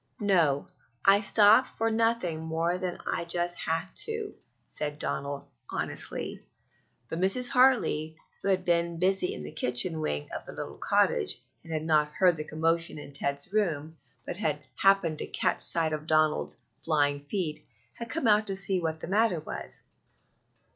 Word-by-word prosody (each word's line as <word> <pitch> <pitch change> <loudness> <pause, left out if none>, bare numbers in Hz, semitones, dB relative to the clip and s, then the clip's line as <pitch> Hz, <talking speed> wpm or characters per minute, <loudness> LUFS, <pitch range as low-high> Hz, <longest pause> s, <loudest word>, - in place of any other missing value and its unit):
"No; 170 -9 +2 0.4
I 195 +1 +6
stopped 215 +4 +5
for 225 0 -2
nothing 225 -7 0
more 165 +2 -1
than 180 -1 -3
I - - -1
just 175 +1 0
had 165 +3 -2
to," 445 -2 -2 0.3
said 150 -1 -5
Donald 140 -1 -4 0.2
honestly; - - -4 0.6
but 165 - -4
Mrs. 195 +7 +2
Hartley, 240 - +3 0.3
who - - -4
had 185 -1 +1
been 170 -1 +1
busy 185 +1 +2
in 75 - -6
the 75 - -7
kitchen 140 - +2
wing 75 - -2
of - - -5
the - - -10
little - - -7
cottage, 75 - +1 0.2
and 165 - -11
had 155 -1 -2
not 150 -2 +2
heard 180 +1 +4
the 155 - -5
commotion 165 +2 -1
in 145 -1 -10
Ted's 140 +5 -3
room, 160 -7 -1 0.3
but - - -5
had 150 -8 -2
happened 195 -5 +3
to - - -4
catch - - 0
sight 160 -2 +5
of 155 0 -5
Donald's 155 -1 +1 0.2
flying 145 -3 +1
heels, 175 -7 -2 0.3
had 235 - -8
come 325 +2 -3
out 215 0 +4
to 195 - +2
see 190 -1 0
what 160 -1 -3
the - - -6
matter 205 -2 +2
was. 155 - -7
170 Hz, 165 wpm, -28 LUFS, 155-195 Hz, 0.6 s, I